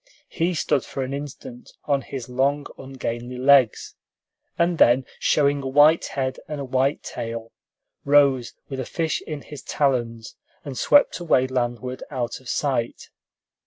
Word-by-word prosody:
He 175 +1 -1
stood 145 -2 +1
for 135 - -4
an 130 +1 -4
instant 140 -3 -8
on 140 -2 +1
his 130 -4 -7
long, 140 +3 0
ungainly 125 -2 -6
legs, 130 -3 +4 0.6
and 170 -1 +1
then, 125 +2 +5
showing 145 -1 +2
a 135 - -4
white 145 +4 +5
head 130 -1 -3
and 150 -1 -5
a 140 - -4
white 130 +2 0
tail, 115 0 -6 0.5
rose 140 -4 +3
with 135 -2 -6
a 130 - -3
fish 165 -2 -2
in 150 -2 -5
his 145 -2 -10
talons, 120 -5 -1 0.3
and 140 -2 -6
swept 290 - +4
away 160 -7 +2
landward 125 0 -3
out 125 -4 -3
of 130 -2 -12
sight. 130 -5 -2
135 Hz, 150 wpm, -23 LUFS, 125-145 Hz, 0.6 s, then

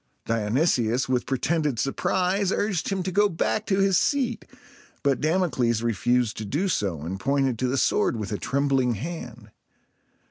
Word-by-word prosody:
Dionysius 115 +2 +1
with 125 -1 0
pretended 150 +1 0
surprise 185 - 0
urged 200 -5 -1
him 195 -2 -1
to 185 - -3
go 205 +3 +3
back 205 +5 -1
to 195 - +1
his 195 -2 +3
seat; 255 -5 0 0.6
but 140 -3 +1
Damocles 145 -9 +1
refused 120 +1 +1
to 110 - -4
do 150 - -1
so, 95 - -1
and 95 +4 -4
pointed 135 0 0
to 130 - +1
the 130 +2 0
sword - - +2
with 105 -2 -5
a 105 - -2
trembling 135 -3 +1
hand. 120 - -7
135 Hz, 155 wpm, -25 LUFS, 115-180 Hz, 0.6 s, go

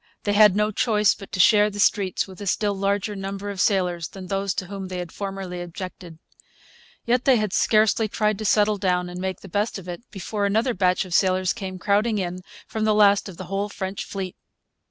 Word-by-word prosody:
They 205 - 0
had 210 -2 +6
no 210 +1 +1
choice 210 -1 +2
but 195 - -12
to 185 - -4
share 210 +2 +6
the 205 0 -8
streets 200 -2 +1
with 190 +1 -12
a 200 - -5
still 205 +2 +1
larger 200 +1 -1
number 195 +1 -5
of 195 - -3
sailors 180 -5 +1
than 190 -1 -10
those 195 +1 -2
to 185 - -3
whom 195 0 -6
they 185 0 -5
had 175 -2 -5
formerly 195 -3 -5
objected. 175 -1 -8 0.9
Yet 245 +1 +1
they 265 -3 +5
had 215 -3 -1
scarcely 220 0 +3
tried 210 0 0
to 215 - -4
settle 210 0 +3
down 180 -2 0
and 180 +1 -6
make 190 -1 -3
the - - -10
best 205 +5 -1
of 185 -2 -10
it 175 +2 -6
before 205 0 -2
another 225 +5 +1
batch 180 -3 +1
of 180 - -7
sailors 185 -1 +2
came 190 -4 -6
crowding 210 +4 +1
in 180 -2 -3 0.3
from 220 - -4
the 215 -1 +3
last 205 -1 +4
of 180 - -11
the - - -6
whole 195 +3 -2
French 190 -1 -5
fleet. 190 -2 -5
195 Hz, 215 wpm, -24 LUFS, 185-210 Hz, 0.9 s, had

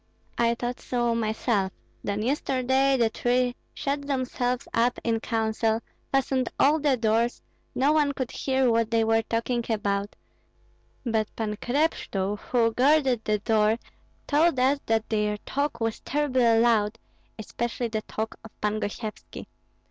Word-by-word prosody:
I 235 0 +2
thought 245 +1 -4
so 240 -2 0
myself; 220 -3 0 0.3
then 205 +1 -2
yesterday 265 +1 +2
the 230 -2 +3
three 245 +2 +1 0.2
shut 280 0 -2
themselves 255 -2 -1
up 240 +2 +2
in 225 -1 +1
counsel, 220 -1 0 0.3
fastened 265 -2 +1
all 300 +3 +5
the 285 -3 +2
doors, 230 +1 +1 0.3
no 275 +3 +3
one 300 -2 +3
could 260 -3 -4
hear 265 -2 +1
what 230 -1 +2
they 230 -1 +2
were 225 0 +3
talking 230 +2 -1
about; 205 -2 -1 0.9
but 220 -3 +1
Pan 215 -2 -2
Krepshtul, 210 -8 -1
who 230 -2 +1
guarded 265 -2 +3
the 215 0 +2
door, 215 +1 +2 0.5
told 305 -1 +3
us 270 +3 +3
that 225 -1 +1
their 210 -1 0
talk 285 -1 -2
was 225 -1 -1
terribly 255 -6 +2
loud, 225 -2 +3 0.4
especially 235 +2 -3
the 220 -1 -2
talk 220 +1 -5
of 225 - -10
Pan 210 +1 0
Gosyevski. 215 +1 -6
235 Hz, 140 wpm, -26 LUFS, 220-260 Hz, 0.9 s, all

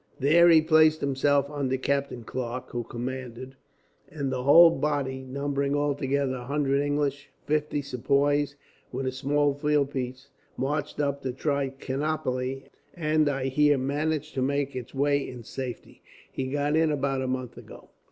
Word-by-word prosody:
"There 170 +6 +6
he 160 -2 +6
placed 155 -1 +5
himself 140 +1 +2
under 135 -3 -1
Captain 140 -2 -2
Clarke, 125 +1 -5
who 120 -1 -3
commanded; 130 +2 -6 0.5
and 140 -3 -3
the 130 -1 -2
whole 165 +6 +8
body, 145 -4 -1
numbering 140 +1 -2
altogether 140 -2 0
a 125 - -8
hundred 140 0 +1
English, 145 -1 -1 0.2
fifty 150 -1 0
Sepoys, 140 +2 +1 0.4
with 130 +1 -3
a 130 - 0
small 145 +2 +1
field 145 -1 +1
piece, 130 0 -5 0.3
marched 145 +2 -2
up 140 -1 -1
to 130 - -2
Trichinopoli, 135 -1 -2 0.3
and 155 -2 +2
I 135 -2 -2
hear 145 +1 +3
managed 150 +3 -2
to 130 - -2
make 140 +1 -1
its 125 +1 -7
way 140 +1 +1
in 125 -2 -9
safety. 125 +1 -7 0.3
He 130 - -3
got 145 +2 0
in 160 -1 +3
about 135 -2 -1
a 130 - -2
month 130 -1 -3
ago." - - -13
140 Hz, 150 wpm, -27 LUFS, 130-145 Hz, 0.5 s, whole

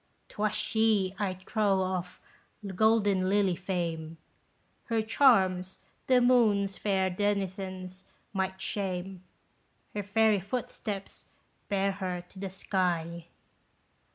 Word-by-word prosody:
'Twas 215 0 -1
she, 220 -4 +2
I 195 -3 -1
trow 195 0 +1
of 180 -1 -3 0.5
'golden 200 -1 +2
lily' 195 -2 +3
fame; 165 -3 -3 0.7
Her 225 -2 0
charms 190 -7 +3 0.3
the 255 -1 +5
moon's 215 -6 +3
fair 190 -2 0
denizens 190 -1 -3 0.3
might 190 -1 -2
shame, 190 -2 -3 0.7
Her 210 - -2
fairy 210 +1 +3
footsteps 200 -1 -5 0.4
bear 200 -1 +1
her 185 -2 -4
to 190 - -12
the 195 0 -4
sky." 170 -3 -2
195 Hz, 100 wpm, -29 LUFS, 185-205 Hz, 0.7 s, the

